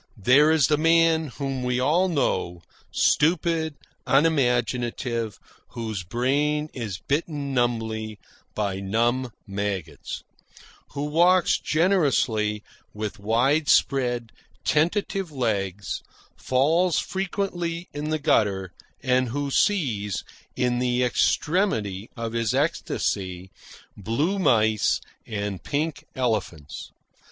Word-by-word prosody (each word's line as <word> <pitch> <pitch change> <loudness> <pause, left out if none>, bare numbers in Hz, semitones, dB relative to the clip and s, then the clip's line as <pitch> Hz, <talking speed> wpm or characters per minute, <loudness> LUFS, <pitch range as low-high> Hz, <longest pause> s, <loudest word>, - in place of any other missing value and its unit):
There 130 +9 +5
is 160 -4 +4
the 150 -1 +2
man 165 0 +4
whom 135 0 -4
we 125 0 0
all 160 +8 +3
know, 90 - -1 0.3
stupid, 160 -1 +2 0.3
unimaginative, 120 -5 +1 0.4
whose 110 -5 -4
brain 145 - 0
is 110 -8 -4
bitten 145 - -2
numbly 110 -3 -1 0.4
by 100 -3 -1
numb 120 +6 0 0.2
maggots; 100 -3 -4 0.7
who 145 0 -3
walks 175 +4 +4
generously 135 - +1 0.3
with 110 0 -4
wide 125 +9 +2
spread, 120 -4 +2 0.3
tentative 175 +3 +1
legs, 100 -7 -2 0.3
falls 160 +7 +2
frequently 180 -3 -2
in 150 +1 -4
the 155 - +1
gutter, 100 - +1 0.3
and 125 -1 +2
who 140 +3 -2
sees, 125 - +1 0.3
in 125 -1 +1
the 125 0 +1
extremity 120 - 0
of 115 -1 -4
his 115 -2 0
ecstasy, 95 -1 -1 0.4
blue 140 - -1
mice 110 - +3 0.3
and 100 -3 -3
pink 150 +1 -2
elephants. 105 - -3
125 Hz, 100 wpm, -25 LUFS, 110-155 Hz, 0.7 s, There